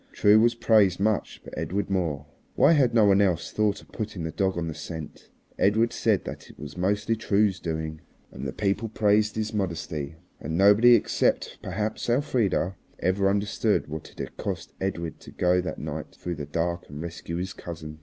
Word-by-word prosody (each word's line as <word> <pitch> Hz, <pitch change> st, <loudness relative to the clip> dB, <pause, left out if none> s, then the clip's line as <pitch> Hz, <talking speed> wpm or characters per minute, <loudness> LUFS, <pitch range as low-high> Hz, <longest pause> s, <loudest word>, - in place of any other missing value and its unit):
True 105 Hz, +1 st, +5 dB
was 120 Hz, +1 st, +4 dB
praised 105 Hz, -6 st, +4 dB
much, 105 Hz, +1 st, 0 dB
but -, -, -10 dB
Edred 100 Hz, +1 st, -2 dB
more. 80 Hz, -6 st, -1 dB, 0.3 s
Why -, -, +6 dB
had 140 Hz, -7 st, +4 dB
no 115 Hz, -3 st, +5 dB
one 100 Hz, 0 st, +5 dB
else 90 Hz, -5 st, +1 dB
thought 105 Hz, -1 st, 0 dB
of -, -, -22 dB
putting 105 Hz, -6 st, -5 dB
the 80 Hz, -, -3 dB
dog 95 Hz, 0 st, 0 dB
on 85 Hz, -1 st, -2 dB
the 80 Hz, -, -3 dB
scent? 80 Hz, -1 st, -8 dB, 0.3 s
Edred 110 Hz, +4 st, +3 dB
said -, -, +1 dB
that -, -, -8 dB
it -, -, -15 dB
was 75 Hz, 0 st, -8 dB
mostly 105 Hz, +4 st, 0 dB
True's 100 Hz, -3 st, +1 dB
doing. 80 Hz, -2 st, -4 dB, 0.3 s
And 70 Hz, -, -6 dB
the -, -, -3 dB
people 105 Hz, -, -1 dB
praised 105 Hz, 0 st, +2 dB
his 110 Hz, 0 st, -2 dB
modesty. 85 Hz, -6 st, -3 dB, 0.2 s
And 80 Hz, +3 st, -3 dB
nobody, 105 Hz, +5 st, +7 dB
except -, -, 0 dB
perhaps 105 Hz, +5 st, -3 dB
Elfrida, 120 Hz, -, +1 dB, 0.2 s
ever 95 Hz, +2 st, +1 dB
understood 100 Hz, -1 st, 0 dB
what 80 Hz, +1 st, -6 dB
it -, -, -21 dB
had -, -, -6 dB
cost -, -, -4 dB
Edred 85 Hz, -4 st, -3 dB
to -, -, -13 dB
go 90 Hz, 0 st, +2 dB
that 90 Hz, -, -5 dB
night 75 Hz, 0 st, -6 dB
through 90 Hz, -, -4 dB
the 75 Hz, -1 st, -5 dB
dark 85 Hz, +3 st, -2 dB
and 75 Hz, -, -8 dB
rescue 85 Hz, 0 st, -6 dB
his 90 Hz, +2 st, -3 dB
cousin. 80 Hz, -2 st, -8 dB
95 Hz, 190 wpm, -26 LUFS, 85-105 Hz, 0.3 s, nobody